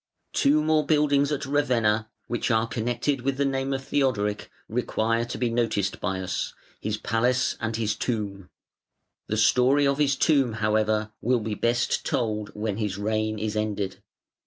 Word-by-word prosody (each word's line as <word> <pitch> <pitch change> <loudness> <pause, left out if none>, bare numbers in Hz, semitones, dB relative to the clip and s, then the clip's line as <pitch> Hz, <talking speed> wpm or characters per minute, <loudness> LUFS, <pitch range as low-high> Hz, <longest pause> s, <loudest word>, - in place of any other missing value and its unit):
Two 150 +2 +3
more 155 0 +3
buildings 145 -1 +2
at 145 -1 -2
Ravenna 115 -6 +1 0.2
which 120 +1 -2
are 110 -1 +3
connected 120 +4 -1
with 135 +1 -1
the 140 - +1
name 135 0 -1
of 135 0 -2
Theodoric 110 -8 0 0.2
require 115 0 0
to 120 - -5
be 120 -2 0
noticed 115 -4 0
by 95 -2 -1
us, 95 0 -3 0.2
his 110 0 -2
Palace 120 +4 +1
and 115 -1 -2
his 110 -2 0
Tomb. 100 -5 -3 0.8
The 110 - -1
story 125 +6 +4
of 140 +1 +1
his 140 -2 +3
Tomb, 135 -6 +3
however, 110 0 +1
will 125 +1 +2
be 110 0 -3
best 120 +3 0
told 105 -3 -1
when 105 -1 -2
his 105 -3 -2
reign 110 +1 -1
is 110 0 -3
ended. 105 -3 -2
115 Hz, 160 wpm, -26 LUFS, 105-135 Hz, 0.8 s, story